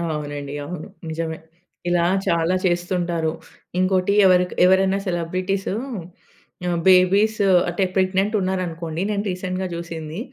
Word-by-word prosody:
అవునండి. 145 -1 -5
అవును. 170 -1 -6 0.2
నిజమే. 160 0 -3 0.5
ఇలా 175 -1 +2 0.2
చాలా 170 +2 +2
చేస్తుంటారు. 175 -2 0 0.5
ఇంకోటి 185 +1 +2
ఎవరికి 180 -1 +3
ఎవరైనా 190 +1 +3
సెలబ్రిటీస్ 185 +3 -2 1.0
ఆహ్, 175 -1 0
బేబీస్ 195 +4 +5 0.3
అంటే 175 +3 0
ప్రెగ్నెంట్ 190 +3 +1
ఉన్నారనుకోండి. 175 -3 -3
నేను 205 -1 -1
రీసెంట్‌గా 185 0 -3
జూసింది. 170 0 -6
180 Hz, 105 wpm, -22 LUFS, 165-190 Hz, 1.0 s, బేబీస్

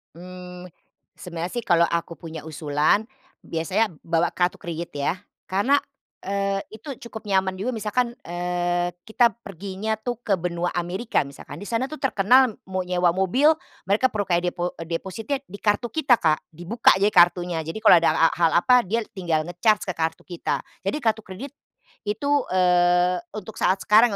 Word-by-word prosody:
Mmm, 180 0 -10 0.5
sebenarnya 175 0 -6
sih, - - -16
kalau 170 -2 +4
aku 170 0 -3
punya 165 -2 -8
usulan 155 +6 +1 0.4
biasanya 185 +5 0
bawa 165 +1 0
kartu 180 0 0
kredit 170 0 -5
ya, 140 +4 0 0.3
karena, 205 +10 +2 0.5
eee, 195 0 0
itu 250 +4 -8
cukup 220 -3 -9
nyaman 190 -1 +2
juga. 200 +7 -3
Misalkan, 235 +2 -1
eee, 175 0 -1 0.2
kita 235 +2 +4 0.2
perginya 200 +3 -4
tuh 240 0 -3
ke 220 -4 -1
Benua 175 -1 -1
Amerika 180 +6 -1
misalkan. 145 +3 -9
Di 205 - -7
sana 235 +3 0
tuh 310 +2 -9
terkenal 250 0 +4
mau 185 -1 -2
nyewa 180 -1 +1
mobil 250 - +4 0.3
mereka 215 +7 +3
perlu 205 -2 -2
kayak 175 -1 +1
depo 175 0 -3
depositnya 190 - -3
di 200 +2 -10
kartu 210 +3 +1
kita 270 -7 +4
Kak. 155 -2 +2
Dibuka 175 +9 +2
jadi 205 +2 +2
kartunya. 175 -1 +4
Jadi 165 +6 -6
kalau 215 -4 +7
ada - - +4 0.2
a - - +1
hal 165 -2 +2
apa 250 +7 +5
dia 225 +3 -2
tinggal 165 -5 -1
nge-charge 205 +5 +1
ke 185 - -2
kartu 165 0 -3
kita. 175 -2 -3 0.2
Jadi - - -1
kartu 225 -3 0
kredit 215 +9 -9 0.5
itu, 220 +8 -1 0.2
eee, 180 -1 +3 0.2
untuk 215 +1 -8
saat 185 - +3
sekarang 215 0 +5
185 Hz, 165 wpm, -24 LUFS, 175-220 Hz, 0.5 s, kalau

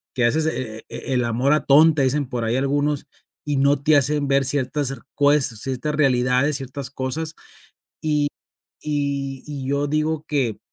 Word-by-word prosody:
que 125 - +1
haces 155 +7 +2
"e 115 -8 -4
e 135 - -4
el 125 -2 +1
amor 120 +4 +1
atonta", 150 0 +5
dicen 140 +2 +1
por 120 -3 -2
ahí 115 +2 0
algunos 145 +2 0 0.4
y 145 -2 -1
no 140 0 +3
te 155 0 +5
hacen 145 +1 +1
ver 135 0 +3
ciertas 140 +1 0
cer 135 - -6 0.2
cues 145 0 +4 0.2
ciertas 135 +3 -3
realidades, 130 0 +2
ciertas 135 0 -6
cosas 150 +4 -3 0.7
y 150 -2 +1 0.5
y 140 -2 -2
y 140 -3 -5
yo 140 +1 0
digo 155 +1 -1
que 130 -7 0
140 Hz, 160 wpm, -22 LUFS, 130-150 Hz, 0.7 s, atonta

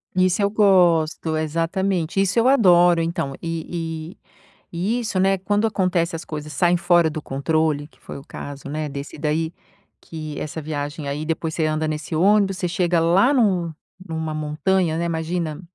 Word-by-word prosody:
Isso 185 +1 +2
eu 200 - +3
gosto, 170 -6 +3
exatamente, 165 +3 -1
isso 195 +3 +1
eu 230 - +4
adoro 175 -9 +5
então 165 -4 -2
e 165 0 -5
e - - -50 0.5
e 200 +8 -1
isso, 215 -5 -2
né, 195 +1 +3
quando 205 +4 +1
acontece, 180 -4 0
as 165 - -6
coisas 150 -1 -6
saem 175 -1 +3
fora 175 -1 +3
do 155 0 -5
controle, 150 +1 -1
que - - -28
foi - - -9
o 135 - -10
caso, 140 0 -8
né, 155 +1 -3
desse 140 +2 -7
daí, 160 +2 -1 0.5
que 155 -3 -7
essa 155 +1 -5
viagem, 145 0 -4
aí, 145 +2 -3
depois 160 0 -2
você 160 - 0
anda 155 0 0
nesse 155 +1 -4
ônibus, 195 +2 +3
você 180 -2 -1
chega 175 -1 +1
lá 185 - +4
num 185 - +1 0.3
numa 160 -1 -4
montanha, 160 +3 0
né, 170 - -1
imagina, 165 -1 -2
165 Hz, 170 wpm, -22 LUFS, 155-185 Hz, 0.5 s, adoro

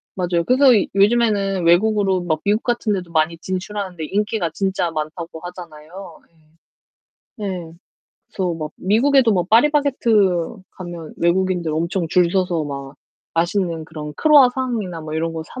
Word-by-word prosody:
맞아요. 175 -2 0
그래서 260 +7 +3 0.3
요즘에는 200 -3 +2
외국으로 195 +1 +3
막 160 -3 -2
미국 210 +2 +2
같은 240 -3 0
데도 180 -3 -5
많이 160 0 +1
진출하는데 185 -1 -5
인기가 205 0 -1
진짜 190 -1 -1
많다고 160 +1 -5
하잖아요. 175 0 -11 1.2
네. 180 -5 -5 0.6
그래서 180 -3 -2
막 155 -1 -5
미국에도 235 +5 +3
뭐 180 -3 +1
파리바게뜨 230 - +2
가면 175 -3 -8
외국인들 175 -1 0
엄청 170 +2 -1
줄 175 +1 +3
서서 180 -4 0
막 140 -1 -7 0.4
맛있는 170 -1 -1
그런 150 -2 -7
크루아상이나 250 - +3
뭐 155 0 -7
이런 165 +1 -1
거 160 -1 -5
사 255 - -10
180 Hz, 320 characters per minute, -20 LUFS, 165-210 Hz, 1.2 s, 그래서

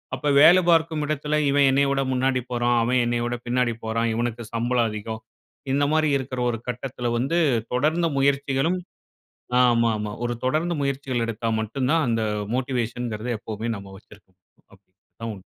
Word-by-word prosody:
அப்ப 145 +3 -1
வேலை 175 +4 +8
பார்க்கும் 160 -2 +2
இடத்தில 150 0 -1
"இவன் 140 0 +4
என்னைய 140 +1 +3
விட 135 0 +1
முன்னாடி 130 0 +1
போறான். 120 0 +1
அவன் 125 +2 +2
என்னைய 120 0 0
விட 120 0 -2
பின்னாடி 125 -1 +1
போறான். 115 +1 0
இவனுக்கு 120 0 -2
சம்பளம் 120 0 +1
அதிகம்" 110 +1 -6 0.5
இந்த 145 +1 +2
மாரி 155 -1 +3
இருக்குற 130 -1 -5
ஒரு 115 - -2
கட்டத்துல 125 0 -3
வந்து 135 +8 0 0.4
தொடர்ந்து 155 +7 +1
முயற்சிகளும், 140 +5 +1 0.8
ஆமாமா. 115 -3 +2
ஒரு 120 0 -2
தொடர்ந்து 160 +6 0
முயற்சிகள் 135 -3 -1
எடுத்தா 115 0 -3
மட்டும் 125 +4 -2
தான் 165 -1 +3
அந்த 115 -1 0 0.3
மோட்டிவேஷன்ங்குறத 120 -3 -2
எப்போமே 110 +2 -5
நாம 100 -1 -11
வச்சுருக்க 105 -1 -18
முடியும். 90 - -39
அப்பிடி. 95 -1 -24 0.2
அதான் 115 0 -5
உண்ம. 95 - -15
125 Hz, 160 wpm, -24 LUFS, 115-140 Hz, 0.8 s, வேலை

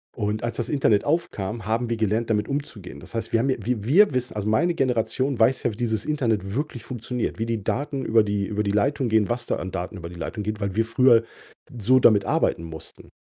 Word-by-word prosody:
Und, 105 0 -2
als 120 - -3
das 120 0 -2
Internet 115 -8 +2
aufkam, 115 - -2
haben 115 +2 -1
wir 115 - -1
gelernt, 110 +2 0
damit 105 -2 +1
umzugehen. 135 -9 -5
Das - - -11
heißt, 115 0 -4
wir 115 - +4
haben 135 +4 +1
ja 130 - +1
wir 115 -1 -2
wir 155 - +5
wissen 125 -2 -2
also 105 -1 -3
meine 165 +11 +2
Generation 130 0 0
weiß 120 +4 +3
ja, 120 - +1
wie - - -9
dieses 110 -4 -1
Internet 115 -10 -1
wirklich 140 -5 -3
funktioniert, 125 0 -4
wie 115 - -1
die 115 -3 -2
Daten 135 +3 -2
über 110 -1 +4
die 100 -1 -1
über 105 +1 -2
die 100 - -1
Leitung 130 +4 +1
gehen, 110 -2 +3
was 120 0 -2
da - - 0
an 95 - -5
Daten 95 +2 -5
über 85 -1 -7
die 90 - -11
Leitung 105 +5 -5
geht, 105 +1 -3
weil 100 -1 -2
wir 115 +1 +2
früher 115 0 +5 0.6
so 130 +5 +4
damit 105 -5 +5
arbeiten - - +1
mussten. 80 -1 -9
115 Hz, 235 wpm, -24 LUFS, 105-125 Hz, 0.6 s, wir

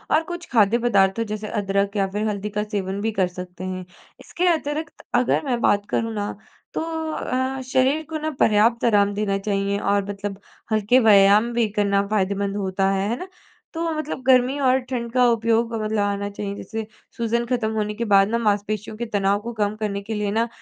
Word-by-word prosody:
और 315 - +3
कुछ 345 0 -6
खाद्य 225 -2 +4
पदार्थों 195 0 +3
जैसे 215 0 -5
अदरक 200 -1 -1
या 195 -1 +2
फिर 210 +2 -1
हल्दी 210 0 -3
का 210 0 -2
सेवन 200 -2 -3
भी 225 +1 0
कर 190 -4 +1
सकते 180 0 -9
हैं। 185 -1 -4 0.3
इसके 360 +1 -2
अतिरिक्त 310 0 -4
अगर - - +2
मैं 250 -3 0
बात 205 0 +2
करूँ 225 0 -1
ना, 205 -1 -2 0.4
तो - - -2 0.3
अ, 260 -2 -2
शरीर 260 +4 +1
को 315 - -3
ना 310 +1 -2
पर्याप्त 225 +3 +3
आराम 205 -3 +3
देना 200 -1 0
चाहिए 200 0 -1
और 200 0 +1
मतलब 200 -1 -5 0.3
हल्के 215 +4 +4
व्यायाम 210 +1 +5
भी 230 -2 +2
करना 200 -1 +2
फ़ायदेमंद 200 -1 0
होता 195 0 0
है। 195 +1 0
है 235 - 0
ना? 365 - -6 0.5
तो 330 0 -2
मतलब 310 -3 -4
गर्मी 255 +1 +4
और 260 -1 +3
ठंड 235 -3 -3
का 250 -1 +4
उपयोग 230 0 +1
मतलब 215 0 -1
आना 200 0 -1
चाहिए। 200 0 -5
जैसे 220 +1 -5 0.3
सूजन 235 +1 0
खत्म 235 -3 -1
होने 210 -1 -1
के 235 +2 -3
बाद 195 -2 +5
ना, 230 - +1
मांसपेशियों 210 -1 -1
के 235 - -3
तनाव 200 0 +2
को 235 +2 -6
कम 210 -1 -1
करने 210 -2 -3
के 215 +3 -5
लिए 210 -1 -1
ना 225 +2 +1
210 Hz, 200 wpm, -23 LUFS, 200-235 Hz, 0.5 s, व्यायाम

